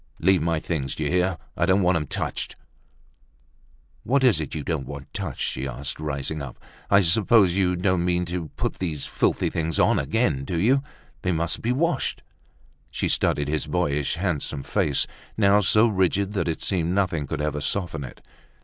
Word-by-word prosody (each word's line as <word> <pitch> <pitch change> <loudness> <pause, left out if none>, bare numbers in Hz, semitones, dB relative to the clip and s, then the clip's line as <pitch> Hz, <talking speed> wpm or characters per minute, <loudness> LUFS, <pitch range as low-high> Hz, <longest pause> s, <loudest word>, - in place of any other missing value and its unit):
"Leave 95 0 +3
my 80 0 +1
things, 75 -5 -3
d'ye 75 -2 -2
hear? 90 0 +1 0.2
I 85 - +1
don't 95 +1 +3
want 90 0 +3
'em 75 -2 -1
touched!" - - -3 1.5
"What's 130 - +3
it 75 -1 -4
you 75 - -3
don't 80 -4 -2
want - - -9
touched?" - - -4
she 65 +1 -2
asked, 70 +3 -5
rising 75 0 -3
up. 70 -3 -7 0.3
"I 100 0 +6
suppose 95 +1 +4
you 90 -1 +2
don't 90 0 +1
mean 90 0 +1
to 85 -1 -4
put - - -3
these 80 -6 -3
filthy - - 0
things 80 0 -1
on - - +4
again, 110 - 0
do 85 +4 -2
you? 130 +9 +3 0.4
They 95 - 0
must 85 0 -1
be 120 - 0
washed." 150 +2 0 0.7
She - - -2
studied 75 -1 +1
his 75 0 -1
boyishly 75 +5 -1
handsome 75 -6 -2
face, 70 -3 +1 0.3
now 100 -1 +5
so 105 +3 +4
rigid 100 -1 +1
that 90 -5 -1
it 80 - -2
seemed 90 -2 +1
nothing 90 -7 0
could - - -3
ever 75 -1 -2
soften 85 -1 -2
it. 65 - -10
85 Hz, 175 wpm, -24 LUFS, 75-95 Hz, 1.5 s, I